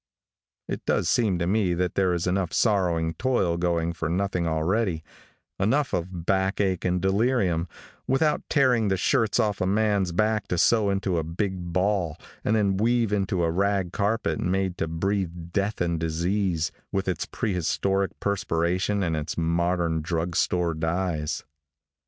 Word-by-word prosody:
It - - -4
does - - +1
seem 105 -2 +2
to 85 - -1
me 95 -2 +1
that 90 0 -1
there 95 -2 +2
is 85 - -2
enough 90 -1 0
sorrowing 90 -7 +1
toil 95 -4 +1
going 85 -1 0
for 80 -2 -3
nothing 90 -1 0
already; 80 +2 0 0.6
enough 130 +8 +1
of 90 -1 -3
back 95 +1 +1
ache 95 -3 0
and 90 0 +1
delirium, 95 -3 +1 0.4
without 150 +3 +2
tearing 125 -6 +3
the 95 -1 +1
shirts 110 +3 +2
off 105 -2 0
a 95 - +1
man's 100 -2 +1
back 110 +3 +1
to 90 - -1
sew 110 +3 +3
into 95 -3 0
a - - -2
big 90 +1 -3
ball, 90 -3 0 0.3
and 110 - +2
then 100 -3 +2
weave 115 0 +2
into 95 -3 0
a 85 - +1
rag 95 0 0
carpet 100 -6 0
made 95 0 0
to 80 - 0
breathe 85 0 -2
death 100 +1 -1
and 85 -2 0
disease, 85 0 0 0.2
with 95 -1 -1
its 90 -3 -2
prehistoric 95 0 -1
perspiration 95 +1 0
and 85 -3 0
its 75 -1 -4
modern 85 0 0
drug 85 +1 -2
store 90 0 +1
dyes. 80 -1 -2
95 Hz, 160 wpm, -25 LUFS, 85-100 Hz, 0.6 s, tearing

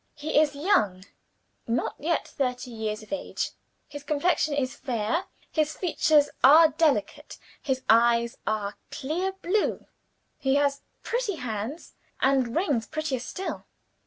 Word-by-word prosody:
"He 295 +1 +1
is 290 -2 +1
young 215 - +1 0.6
not 235 +1 0
yet 330 +2 -1
thirty 250 -2 -3
years 220 -1 -4
of 215 - -8
age. 290 - -3 0.4
His 290 -1 -8
complexion 300 +1 +1
is 260 -3 -1
fair; 245 - -1 0.3
his 310 -1 0
features 305 -4 +3
are 310 +5 +8
delicate, 295 -9 0 0.2
his 260 -2 -2
eyes 235 +1 +4
are 210 -1 -2
clear 340 +8 -2
blue. 410 +5 0 0.5
He 270 -2 +1
has 280 -1 +1 0.2
pretty 475 -5 -1
hands, 245 +3 -5 0.3
and 260 -3 +2
rings 290 - +1
prettier 310 -4 -2
still. 370 +10 -5
280 Hz, 130 wpm, -26 LUFS, 235-310 Hz, 0.6 s, are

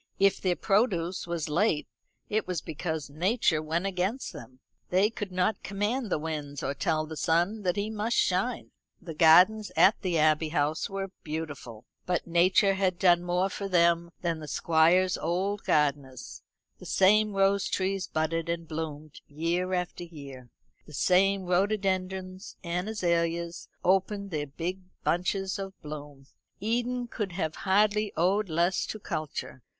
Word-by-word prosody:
If 195 0 +3
their 180 -2 +1
produce 190 -5 0
was 170 -2 -2
late 160 0 +1 0.4
it 215 -2 -1
was 180 -3 -1
because 160 0 -4
nature 175 - +1
went 165 +4 -2
against 195 +7 -2
them. 130 -4 -11 0.3
They 195 +4 +3
could 205 -4 -5
not 185 +3 0
command 210 +5 -2
the - - +1
winds, 150 -2 -5
or 140 - -1
tell 155 +1 0
the 160 0 -8
sun 175 +7 +1
that 180 -3 0
he 205 +2 -2
must 220 +2 -1
shine. 195 +7 0 0.3
The 170 -4 -8
gardens 180 +7 +5
at 200 - +5
the 180 -4 0
Abbey 155 0 +3
House 150 0 0
were 195 -1 -4
beautiful, 145 -8 -6 0.2
but 180 -1 0
nature 180 +4 +4
had 190 -2 0
done 175 -2 +4
more 175 +2 0
for 200 0 -5
them 170 -1 +3
than 170 -2 -1
the 155 - -8
Squire's 170 +5 +3
old 190 +5 -1
gardeners. 140 -4 -1 0.4
The - - -10
same 210 +2 +4
rose 195 0 +2
trees 195 0 -1
budded 165 +1 -1
and 170 -1 -3
bloomed 155 -2 -6
year 170 +5 -1
after 180 0 -3
year; 140 -7 -11 0.4
the 150 - -13
same 195 +4 +3
rhododendrons 185 0 -1
and 175 +3 -2
azaleas 170 -4 -1 0.2
opened 195 +2 +1
their 150 -2 -2
big 170 +7 -4 0.2
bunches 190 +2 0
of 195 0 -7
bloom. 145 -2 -9 0.3
Eden 245 +3 -1
could 210 -5 -4
have 160 -4 -3
hardly 210 +1 +3
owed 190 +4 +2
less 170 +3 +1
to - - -5
culture. 155 -7 -5
180 Hz, 150 wpm, -28 LUFS, 160-195 Hz, 0.4 s, gardens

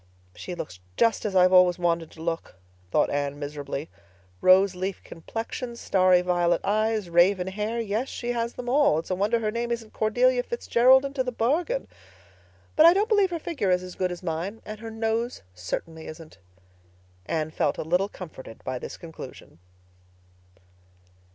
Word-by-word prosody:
"She 95 - -6
looks 90 - -7 0.2
just 225 -2 +2
as 200 -2 -2
I've 185 0 +5
always 180 -1 +6
wanted 170 -2 0
to 160 - -10
look," 165 - -3 0.3
thought - - +2
Anne 145 0 -1
miserably. 145 0 -5 0.5
"Rose 190 +1 +6
leaf 185 +1 -4
complexion—starry 195 -2 0
violet 175 -1 +2
eyes—raven 200 -4 +2
hair—yes, 215 +3 -2
she 240 0 -3
has 235 0 -2
them 250 - -7
all. 270 - +4
It's 165 - -4
a - - +2
wonder 205 +5 +1
her 215 -2 -1
name 235 +1 -2
isn't 230 -2 -4
Cordelia 245 +3 +2
Fitzgerald 245 +2 +4
into 275 -1 -1
the 250 - -3
bargain! 320 - 0 0.9
But 310 +1 +8
I 340 - +7
don't 415 +4 +1
believe 410 -4 +4
her 345 - -2
figure 305 - -2
is 180 0 +2
as 180 0 -8
good 185 -1 -1
as 180 +1 -7
mine, 180 +6 -4
and 215 0 -7
her 225 +1 -7
nose 225 - -2
certainly 160 - -5
isn't." 155 - -11 0.9
Anne 155 -1 -1
felt - - 0
a - - -3
little 180 +5 +1
comforted 145 - -10
by 130 -1 -3
this - - -7
conclusion. 160 - -11
195 Hz, 160 wpm, -26 LUFS, 170-235 Hz, 0.9 s, But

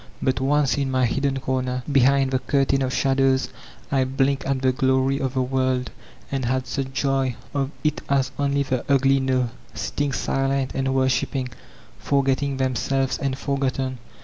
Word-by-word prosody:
But, 130 0 0
once, 145 +1 +2
in 140 -1 0
my 130 -1 +2
hidden 135 +2 0
comer, 130 -1 -1
behind 135 0 +4
the 130 - +1
curtain 135 0 +1
of 130 -1 0
shadows, 135 0 +2 0.4
I 135 -1 +3
blinked 135 +1 0
at 135 -1 -1
the 130 - +4
glory 130 +1 +1
of 135 -1 -2
the 130 - +2
world, 130 -1 0 0.4
and 135 -2 -1
had 130 +1 0
such 130 0 -3
joy 135 -2 0 0.2
of 135 -2 0
it 150 -1 0
as 135 -2 +2
only 140 0 +1
the 130 -2 -2
ugly 135 0 +4
know, 130 -2 0 0.2
sitting 145 -1 -2
silent 135 0 0
and 135 0 0
worshiping, 130 0 0 0.5
forgetting 140 0 +1
themselves 130 +1 0
and 135 -1 -1
forgotten. 135 -2 -2
135 Hz, 160 wpm, -23 LUFS, 130-135 Hz, 0.5 s, behind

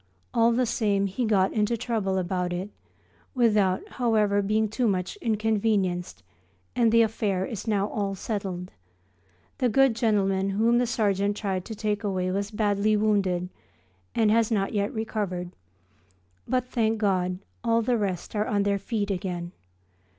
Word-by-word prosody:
All 230 0 +4
the 250 +2 +2
same 210 -4 +1
he 200 +6 -2
got 195 -3 +2
into 220 +2 +1
trouble 215 -5 -1
about 180 -1 -1
it, 185 +4 -4 0.6
without, 210 -6 +2
however, 215 -4 +1
being 215 +2 +1
too 235 +3 0
much 185 - -1
inconvenienced, 210 - 0 0.5
and 230 -2 +3
the 230 0 +6
affair 205 -4 -1
is 220 +1 -6
now 205 -2 +1
all 200 -2 -2
settled. 190 -3 -4 0.9
The 250 - +2
good 270 0 +4
gentleman 195 -4 +1
whom 225 +4 +3
the 245 - +1
sergeant 205 -3 0
tried 190 -3 -2
to 220 - -6
take 210 -1 -2
away 185 -2 -1
was 200 +1 -2
badly 210 0 +1
wounded 195 -4 +1 0.7
and 220 -2 +3
has 225 0 +3
not 200 -4 0
yet 205 -1 0
recovered; 200 -5 -3 1.0
but 255 0 0
thank 225 -3 0
God 185 -3 0 0.3
all 230 -1 +2
the 245 +2 +1
rest 195 -3 -3
are 210 +1 0
on 205 -1 +1
their 200 0 +1
feet 205 0 -2
again. 180 -2 -3
205 Hz, 150 wpm, -26 LUFS, 195-225 Hz, 1.0 s, the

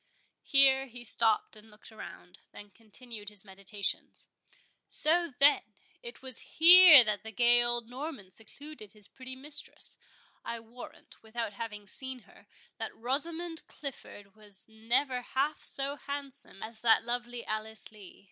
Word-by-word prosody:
Here 270 -1 +3
he 245 -1 -11
stopped 225 -1 +1
and 215 +1 -16
looked 210 +1 -15
around, 180 -4 -12
then 205 0 -13
continued 220 0 -11
his 210 -1 -8
meditations—"So, 205 - -3
then, 285 +1 +5 0.4
it 475 - -10
was 260 -3 -1 0.2
here 335 -4 +10
that 210 -2 -2
the 220 - -9
gay 240 +2 +4
old 240 -1 -1
Norman 255 - -8
secluded 225 +1 -12
his 210 -2 -7
pretty 260 0 -11
mistress—I 265 -4 -2
warrant, 230 +2 -14
without 225 -1 -5
having 210 -1 -7
seen 260 +5 -8
her, - - -21 0.3
that - - -6
Rosamond 320 +7 -2
Clifford 205 -8 -10
was 205 -2 -10
never 240 +4 -1
half 275 +4 -2
so 280 +1 0
handsome 280 -7 -8
as 220 0 -9
that 225 -1 +4
lovely 240 0 -3
Alice 215 +1 0
Lee. 205 -4 -13
240 Hz, 135 wpm, -30 LUFS, 215-275 Hz, 0.4 s, here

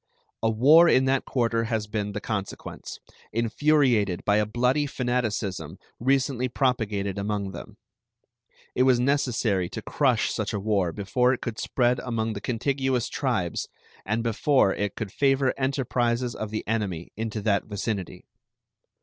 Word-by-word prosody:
A 115 - +2
war 150 +10 +6
in 130 - +4
that 135 0 +1
quarter 115 -2 0
has 110 -2 -1
been 105 -1 -3
the 105 - -3
consequence, 100 -2 -5 0.3
infuriated 115 - +2
by 105 0 +3
a 105 -1 +1
bloody 125 +6 +1
fanaticism 120 -7 -2 0.2
recently 130 0 +1
propagated 105 -7 -1
among 100 -1 -2
them. - - -10 1.0
It - - 0
was 130 -2 +4
necessary 120 -8 +1
to - - -6
crush - - +1
such - - -2
a 105 - -1
war 100 -4 +1
before 125 +8 +1
it 130 - -4
could 115 -3 -5
spread 125 -1 +1
among 115 -2 -2
the 100 - -6
contiguous 130 +1 -1
tribes 115 - -1 0.4
and 110 +3 -1
before 115 -1 +2
it 105 0 -3
could 110 -4 -5
favor 135 0 +2
enterprises 125 -3 0
of 110 - -5
the 110 0 -4
enemy 100 -7 -2
into 110 0 -3
that 100 -2 +1
vicinity. 105 -2 -4
115 Hz, 145 wpm, -26 LUFS, 105-130 Hz, 1.0 s, war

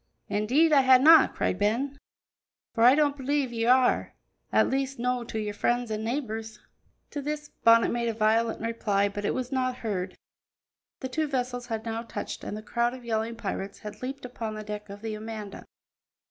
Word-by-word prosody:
"Indeed 260 +11 +3
I 280 - +7
hae 260 -1 +7
no'," 315 +5 +8
cried 185 - -2
Ben, 255 +7 0 0.7
"for 230 - +1
I 250 +3 +8
don't 290 -2 +2
believe 275 -2 -1
ye 230 -1 -1
are 250 +2 +7
are; 255 - +1 0.4
at - - +4
least, 270 0 -1
no' 250 0 -1
to 225 - -5
your 210 -1 -3
friends 240 +2 0
an' 215 0 -2
neebours." 225 -3 -4 0.5
To 290 - -4
this 295 +1 -4
Bonnet 230 0 +6
made 235 0 -1
a - - -1
violent 225 +1 +1
reply, 210 -3 0
but 205 +1 -5
it - - 0
was 255 0 -3
not 255 -1 0
heard. 185 -3 -2 0.9
The 260 - -4
two 310 +4 -1
vessels 245 -2 -3
had 225 -1 -4
now 225 0 -3
touched 230 - -6
and 210 - -5
the 215 - -8
crowd 235 +3 0
of 250 -2 -12
yelling 225 0 -1
pirates 200 -2 -5
had 210 0 -9
leaped 265 +1 -5
upon 230 -3 -5
the 215 - -6
deck 210 0 -7
of 200 +2 -10
the 220 -1 -3
Amanda. 215 -1 -7
230 Hz, 195 wpm, -27 LUFS, 215-260 Hz, 0.9 s, no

